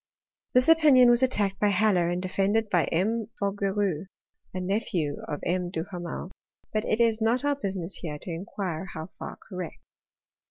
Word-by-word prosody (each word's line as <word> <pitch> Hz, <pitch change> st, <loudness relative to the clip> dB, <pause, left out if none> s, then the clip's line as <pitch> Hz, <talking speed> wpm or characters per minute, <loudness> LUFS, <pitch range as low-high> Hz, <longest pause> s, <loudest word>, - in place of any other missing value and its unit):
This 250 Hz, +1 st, +5 dB
opinion 295 Hz, -7 st, +7 dB
was 240 Hz, +1 st, +3 dB
attacked 205 Hz, -7 st, +1 dB
by 210 Hz, -, +3 dB
Haller, 190 Hz, -3 st, +3 dB
and 175 Hz, 0 st, -1 dB
defended 200 Hz, +4 st, 0 dB
by 175 Hz, -4 st, +3 dB
M. 215 Hz, +6 st, 0 dB
Fougeroux, 195 Hz, -3 st, -1 dB, 0.4 s
nephew 180 Hz, -5 st, -2 dB
of 145 Hz, -, -4 dB
M. 180 Hz, 0 st, 0 dB
Duhamel; 175 Hz, +1 st, -5 dB, 0.4 s
but 215 Hz, 0 st, +1 dB
it 220 Hz, -, 0 dB
is 230 Hz, -1 st, +3 dB
not 235 Hz, +5 st, +2 dB
our 290 Hz, 0 st, +2 dB
businiess 195 Hz, -8 st, -4 dB
here 150 Hz, -4 st, -4 dB
to 175 Hz, -, -7 dB
inquire 180 Hz, 0 st, -4 dB
how 160 Hz, +3 st, -6 dB
far -, -, -6 dB
correct. 180 Hz, -4 st, -6 dB
195 Hz, 155 wpm, -27 LUFS, 175-220 Hz, 0.4 s, opinion